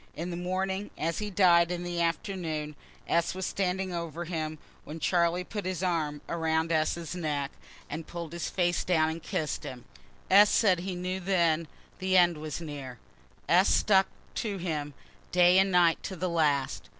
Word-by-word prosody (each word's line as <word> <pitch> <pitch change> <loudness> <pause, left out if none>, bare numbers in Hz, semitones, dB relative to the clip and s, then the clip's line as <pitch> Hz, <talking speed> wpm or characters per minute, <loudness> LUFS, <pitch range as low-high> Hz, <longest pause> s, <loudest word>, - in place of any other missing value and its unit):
In 175 +2 -4
the - - -3
morning, 190 +3 -2
as 165 +1 -1
he 210 -1 -3
died 175 -3 +5
in 175 0 -3
the 175 -1 -2
afternoon, 165 -3 -2 0.3
S. 170 +1 +1
was 190 0 -3
standing 190 -1 -1
over 170 0 -4
him, 155 -2 -3 0.3
when 155 +2 -8
Charlie 175 +1 +2
put 210 +3 -6
up 200 - -6
his 185 -1 -3
arms 155 -5 -1
around 160 0 0
S.'s 160 +1 0
neck, 150 -5 -2 0.4
and 160 +2 -6
pull'd 170 -2 -6
his 170 - -3
face 175 -1 0
down 160 -3 +2
and 165 +1 -6
kiss'd 155 -1 -3
him. 125 -2 -8 0.5
S. 205 +2 +8
said 190 -6 +3
he 185 +1 -4
knew 180 +1 -3
then 170 -4 +1 0.3
the 190 0 +2
end 175 -3 +4
was 155 +1 -5
near. 145 -6 -7 0.5
(S. 180 +3 +5
stuck 195 -2 +4 0.3
to 205 -3 -3
him 150 -5 -3 0.4
day 180 +1 +6
and 195 0 +3
night 175 -2 +4
to 190 - -5
the 180 +1 -2
last.) 150 -5 0
170 Hz, 175 wpm, -29 LUFS, 160-185 Hz, 0.5 s, S